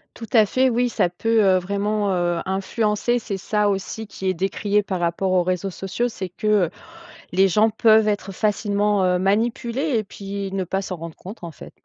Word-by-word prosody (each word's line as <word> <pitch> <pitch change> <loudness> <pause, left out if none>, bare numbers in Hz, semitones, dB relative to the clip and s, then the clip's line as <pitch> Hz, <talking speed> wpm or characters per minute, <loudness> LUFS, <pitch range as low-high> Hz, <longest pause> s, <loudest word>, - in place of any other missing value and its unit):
Tout 230 - -9
à 220 -3 +6
fait 260 +5 +2
oui. 245 +1 +1
Ça 210 - +1
peut, 225 +5 +1
heu, 190 -1 +5
vraiment, 200 +2 -1
heu, 175 -1 0
influencer. 210 +4 0
C'est 215 -3 -4
ça 210 +2 0
aussi 200 +3 -3
qui 190 -2 -5
est 185 - +1
décrié 200 +3 0
par 185 -3 -3
rapport 175 +2 0
aux 185 -1 +4
réseaux 185 +2 -1
sociaux, 195 +7 -2
c'est 190 -5 -6
que, 180 +4 -7 0.2
heu, - - -9 0.6
les 190 +2 +4
gens 215 +4 +4
peuvent 220 0 +4
être 205 -1 -2
facilement, 205 0 +1
heu, 180 0 +2
manipulés 235 - 0
et 215 - -2
puis 200 0 -6
ne 195 -1 -1
pas 190 +2 -2
s'en 185 -1 -5
rendre 165 -1 -8
compte 195 0 -10
en 170 - -5
fait. 155 - -12
200 Hz, 205 wpm, -22 LUFS, 185-215 Hz, 0.6 s, à